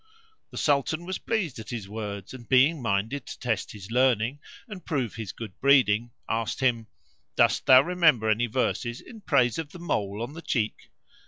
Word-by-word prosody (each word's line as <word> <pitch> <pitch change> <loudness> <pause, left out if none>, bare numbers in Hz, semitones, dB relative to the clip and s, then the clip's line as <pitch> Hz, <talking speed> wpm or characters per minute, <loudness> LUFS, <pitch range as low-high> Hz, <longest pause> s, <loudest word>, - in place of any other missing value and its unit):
The - - -10
Sultan 155 +3 +1
was 185 +1 -4
pleased 195 - -2
at 110 - -9
his 110 -5 -5
words 100 -1 -6
and, 120 -3 -11
being 135 +4 +4
minded 115 +5 -1
to - - -7
test 110 -5 -2
his 100 0 -10
learning 125 +1 +2 0.3
and 205 -5 -9
prove 135 - -2
his 110 -4 -6
good 105 -2 -9
breeding, 120 -5 +4 0.2
asked 115 0 -2
him, 120 -4 +1 0.5
"Dost - - +2
thou 130 0 +9
remember 165 -10 +3
any 110 +3 +2
verses 120 0 -1
in 225 -3 -13
praise 125 - +2
of 155 -3 -5
the - - -8
mole 110 - -2
on 130 +5 -6
the 165 - -8
cheek?" 115 -9 -2
125 Hz, 180 wpm, -26 LUFS, 110-145 Hz, 0.5 s, thou